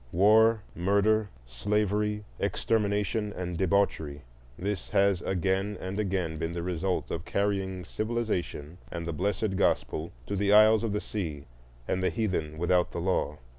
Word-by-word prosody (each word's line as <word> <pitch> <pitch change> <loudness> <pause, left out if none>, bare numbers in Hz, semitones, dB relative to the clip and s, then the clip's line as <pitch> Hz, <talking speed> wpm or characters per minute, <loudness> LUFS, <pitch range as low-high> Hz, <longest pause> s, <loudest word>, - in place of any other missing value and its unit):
War, 110 +4 +5
murder, 100 +3 +2 0.2
slavery, 105 - 0 0.2
extermination, 105 +1 0
and 90 -2 -4
debauchery,—this 80 -3 -2
has 100 -2 +3
again 95 +3 0
and 95 +2 -4
again 90 -6 -1
been 80 +2 -2
the 85 -1 -3
result 90 +1 -2
of 85 - -3
carrying 95 -3 -1
civilization 105 -8 -3
and 85 -1 -4
the 85 - -3
blessed 100 +3 -1
gospel 85 -4 0
to 100 - -3
the 100 +1 +2
isles 110 +1 +7
of 110 -3 -1
the 105 - -1
sea 80 -9 -4 0.4
and 95 - 0
the 95 - +3
heathen 90 -9 -2
without 90 +1 +2
the - - -3
law. 85 -4 0
95 Hz, 140 wpm, -28 LUFS, 85-105 Hz, 0.4 s, isles